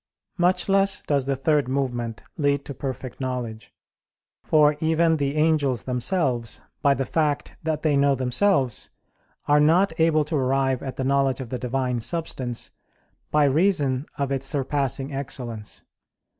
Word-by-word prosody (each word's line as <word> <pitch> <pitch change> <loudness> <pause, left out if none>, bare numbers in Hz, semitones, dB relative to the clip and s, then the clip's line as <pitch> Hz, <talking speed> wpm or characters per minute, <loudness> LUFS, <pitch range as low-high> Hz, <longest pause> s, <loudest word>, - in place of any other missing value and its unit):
Much 180 +1 +2
less 195 0 +2
does 140 -3 0
the 135 - +1
third 145 +1 +1
movement 120 -4 -2
lead 140 -2 0
to 140 - -6
perfect 130 -1 -6
knowledge: 125 -4 -4 0.7
for 150 -1 +4
even 160 +1 +2
the 140 0 -1
angels 150 -5 +2
themselves, 125 - -1 0.2
by 140 -1 +4
the 135 - -2
fact 150 -1 -1
that 155 -1 -2
they 155 -2 +2
know 140 0 +3
themselves, 130 - +1 0.6
are 145 0 +5
not 165 +5 +4
able 160 -2 +3
to 155 +2 -3
arrive 135 -1 +1
at 135 -2 -5
the 130 - -3
knowledge 135 -1 +1
of 130 -3 -6
the 125 - -4
Divine 125 0 -1
Substance, 130 -4 -4 0.6
by 150 0 +3
reason 145 -3 +2
of 140 -1 -1
its 135 0 -1
surpassing 135 0 -1
excellence. 125 -5 -6
140 Hz, 145 wpm, -24 LUFS, 130-155 Hz, 0.7 s, are